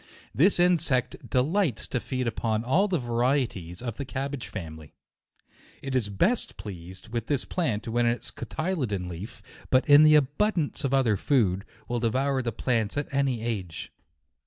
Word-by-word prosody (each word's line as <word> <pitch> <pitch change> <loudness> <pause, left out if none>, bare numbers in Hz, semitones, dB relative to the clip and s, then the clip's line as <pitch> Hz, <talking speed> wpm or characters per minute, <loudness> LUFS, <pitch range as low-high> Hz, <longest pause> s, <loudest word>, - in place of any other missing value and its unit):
This 180 +7 +4
insect 165 -8 +1
delights 145 - +1
to 125 - -1
feed 130 +1 -3
upon 110 -1 -1
all 165 +12 +3
the 185 -3 +1
varieties 120 - -1
of 120 -3 -4
the 140 - -3
cabbage 135 -1 -4
family. 80 -5 -8 0.9
It 135 -1 -3
is 115 -5 +1
best 185 - 0
pleased 95 0 -8
with 115 -1 -3
this 145 -3 0
plant 120 - -2
when 120 +1 +1
in - - +4
its 120 - -6
coty 180 +4 -3
ledon 105 - -2
leaf; 90 +6 -8 0.3
but 130 0 +3
in 145 0 +8
the 155 0 +7
absence 150 +3 0
of 135 - 0
other 130 -6 +3
food, 100 -6 +1 0.2
will 120 0 -1
devour 130 +4 +1
the 120 -2 -2
plant 115 0 -1
at 145 -1 -3
any 135 -5 0
age. 95 -8 -4
125 Hz, 165 wpm, -27 LUFS, 110-145 Hz, 0.9 s, in